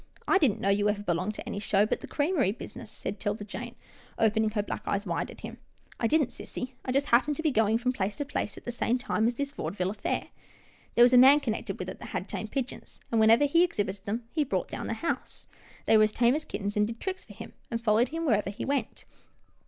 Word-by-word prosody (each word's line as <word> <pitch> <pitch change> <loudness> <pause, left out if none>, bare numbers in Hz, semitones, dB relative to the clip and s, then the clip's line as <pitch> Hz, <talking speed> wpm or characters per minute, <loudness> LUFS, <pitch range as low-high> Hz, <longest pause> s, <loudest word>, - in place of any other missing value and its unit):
" - - -33
I 390 - +5
didn't 265 - +2
know 195 - 0
you 205 +1 +3
ever 205 0 -1
belonged 180 +3 -1
to - - -7
any 200 - -3
show, 205 0 +2
but - - -1
the - - -8
creamery 290 - +1
business," 235 -1 -9
said 205 -2 -6
'Tilda 205 0 -2
Jane, 220 +4 -7 0.4
open 220 0 +3
ing 220 - +2
her 210 -1 -1
black - - -5
eyes 200 +1 -1
wide - - -2
at - - -12
him. - - -8 0.2
" - - -26
I 230 - +2
didn't, 300 0 +3
sissy. 255 0 -6
I 255 - -2
just 275 +2 +2
happened 260 +5 +4
to 320 - -4
be 310 - +3
going 220 -2 +3
from 250 +2 0
place 205 -3 -2
to 290 - -2
place 270 -7 -3
at - - -12
the 240 - -2
same 240 +1 0
time 240 -3 0
as 240 - 0
this 280 +2 -3
vaude 285 - -5
ville 185 -1 -1
affair. 205 0 -3 0.7
There 240 - +7
was 245 +1 +6
a 250 - +9
man 270 +3 +8
connected 225 -6 -3
with - - -5
it - - -7
that - - -8
had - - -4
tame - - -4
pigeons, 265 -2 -5
and, 230 - +2
whenever 225 +6 +6
he 335 +5 +4
exhibited 205 - -2
them, 225 +3 -2
he 310 - +1
brought 280 - -2
down - - -5
the - - -1
house. - - -4 0.4
They 220 - +6
were 215 - +6
as 215 - -1
tame 235 +2 +3
as 305 +2 -2
kittens, 205 0 -4
and 210 0 +3
did 230 +1 -7
tricks 375 -1 -4
for - - -13
him, - - -10 0.2
and 230 - -2
followed 230 +1 +3
him 330 +1 -3
wherever 210 -8 +2
he 205 +4 -5
went." 280 0 -2
230 Hz, 260 wpm, -28 LUFS, 210-270 Hz, 0.7 s, a